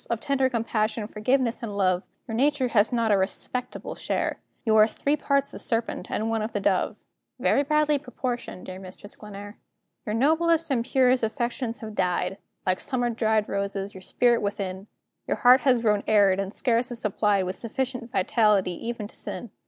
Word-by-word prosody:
Of 235 - -1
tender 270 0 +1
compassion, 225 -2 -1
forgiveness, 235 +3 0
and 210 -4 -5
love, 185 -2 +1 0.2
Your 225 - -5
nature 265 +1 +2
has 215 -2 +3
not 230 -3 +1
a 205 - +5
respectable 240 +6 -3
share; - - -2 0.3
You 220 -1 +3
are 215 0 +7
three 285 +5 0
parts 280 -1 0
of - - -5
serpent, 230 -1 -2
and 220 - -1
one 225 -1 0
of 220 +1 -4
the 205 - 0
dove 195 -2 0 0.3
Very - - +3
badly 300 0 +2
proportioned, 250 -6 -5
dear 185 0 -7
Mistress 190 +2 -11
Glenare. 205 0 -10 0.5
Your 210 - -1
noblest 320 +5 +2
and 240 -3 +1
purest 255 -1 +3
affections 235 +1 -2
have 220 -1 -7
died, 185 0 -1 0.3
Like 185 0 +1
summer 245 -3 -1
dried 220 -2 +1
roses, 200 0 -3
your 190 - -10
spirit 240 +5 +2
within; 200 -1 -4 0.4
Your - - 0
heart 250 +2 +6
has 250 -4 +3
grown 210 -3 +2
arid, 200 -3 +4
and 195 0 -2
scarce 235 +2 +1
is 240 -2 -1
supplied 205 -2 +1
With 185 +1 -3
sufficient 245 0 -4
vitality 205 -3 +2
even 230 +3 -5
to - - -16
sin. 235 - -5
225 Hz, 180 wpm, -26 LUFS, 205-250 Hz, 0.5 s, are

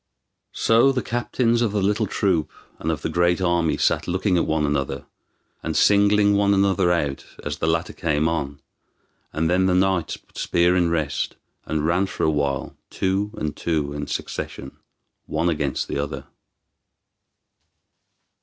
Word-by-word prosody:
So 115 +4 +4
the 130 -2 -2
captains 120 0 0
of 110 -4 0
the 105 - +1
little 105 +2 +1
troop 90 -5 0 0.3
and - - -3
of 80 - -4
the - - 0
great 85 +1 +2
army 85 -3 +1
sat - - +1
looking 95 +1 +1
at 85 - +1
one 80 -1 +1
another, 70 -1 -2 0.6
and 80 -2 -2
singling 100 +2 +4
one 100 0 +3
another 95 -2 +2
out 75 -6 -1 0.2
as 75 0 -4
the 80 - 0
latter 80 +1 0
came 80 -1 0
on, 70 -4 -2 0.7
and 80 +2 0
then 90 +2 +2
the 90 - +2
knights 95 -3 +1
put - - -14
spear 85 +1 +2
in 90 -2 +2
rest, 80 -5 -1 0.3
and 80 -1 -1
ran 90 +4 +2
for - - -4
a 80 - +3
while 70 -3 -2
two 95 +2 -1
and 75 -1 -3
two 75 -4 -1
in 75 0 -5
succession, 70 0 -5 0.5
one 80 +3 0
against 75 -4 -1
the - - -3
other. 70 0 -4
85 Hz, 160 wpm, -23 LUFS, 75-100 Hz, 0.7 s, So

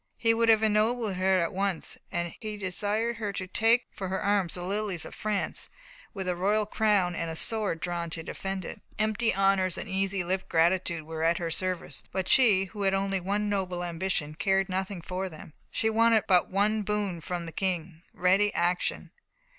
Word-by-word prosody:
He 230 -1 +3
would 230 0 +2
have 220 -1 +5
ennobled 220 0 +2
her 185 0 +2
at 170 - -3
once, 195 -2 -1 0.2
and 170 -1 -2
he 215 -1 -5
desired 205 +4 -1
her 210 -3 -2
to 185 - -3
take 225 +5 +3
for 190 - -5
her 190 +1 -2
arms 200 -3 +1
the 175 - -6
lilies 195 -2 -2
of - - -9
France, 210 -2 -2 0.4
with 190 -2 -5
a 180 - 0
royal 205 +4 +1
crown 205 -4 +2
and 165 -1 -2
a 160 - -4
sword 210 -2 +2
drawn 170 0 -3
to 165 0 -6
defend 190 +1 -4
it. - - -8 0.2
Empty 215 +1 +1
honours 195 -2 +2
and - - -5
easy 195 -1 0
lip 185 +2 -2
gratitude 170 0 +2
were 160 +1 -6
at 165 +1 +3
her 170 -1 -3
service, 185 +1 -2
but 190 -1 -2
she, 210 -7 +5
who 205 +2 -8
had 195 -1 +2
only 195 0 0
one 200 +3 -1
noble 185 -3 -1
ambition, 170 -3 -2
cared 195 +4 +1
nothing 190 -1 -3
for 185 +2 -3
them. 155 -2 -12 0.2
She 220 - -1
wanted 225 0 +4
but 180 -2 +4
one 210 +3 +1
boon 205 -4 -2
from 175 +2 -4
the 165 - -7
King 175 -3 -2
ready 195 +3 +3
action. 175 +1 0
190 Hz, 195 wpm, -28 LUFS, 175-210 Hz, 0.4 s, have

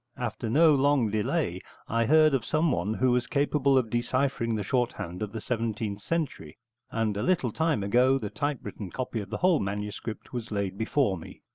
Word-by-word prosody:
After 115 -2 -3
no 155 +6 +5
long 140 -5 +3
delay 105 -1 -1 0.3
I 115 0 +1
heard 155 0 +5
of 130 -4 +1
someone 125 - 0
who 130 +1 +2
was 125 0 +1
capable 140 -1 +2
of 115 -4 +1
deciphering 120 -1 0
the 105 - -2
shorthand 105 -6 -2
of 105 -1 -3
the 110 - -5
seventeenth 110 -3 -3
century, 145 - -3 0.3
and 110 -2 -1
a 100 - -2
little 170 -10 +1
time 160 -5 0
ago 125 +6 +4
the 105 -6 -5
typewritten 120 -9 -4
copy 125 +3 -3
of 100 -2 -7
the - - -3
whole 180 -3 +3
manuscript 105 +4 -5
was 120 -2 -4
laid 100 -3 -2
before 110 - 0
me. - - -12
120 Hz, 180 wpm, -28 LUFS, 105-140 Hz, 0.3 s, no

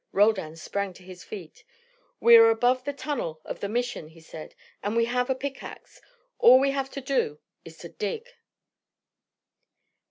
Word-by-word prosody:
Roldan 195 -6 +2
sprang 200 +4 -4
to 180 - -16
his 180 0 -12
feet. 180 -7 -10 0.6
"We 470 0 +7
are 455 0 +8
above 255 - +1
the 285 - -1
tunnel 280 - -4
of - - -6
the 200 - -4
Mission," 245 -7 -3
he 160 +1 -17
said. 160 -1 -11 0.3
"And 205 +2 -3
we 230 0 +3
have 250 +2 -1
a 265 - +1
pickaxe. 275 +1 -8 0.4
All 255 +2 +8
we 275 +1 +2
have 275 -1 -2
to - - -3
do 255 - -1 0.3
is 165 0 -13
to 170 - -10
dig." 320 - -5
230 Hz, 165 wpm, -26 LUFS, 180-270 Hz, 0.6 s, are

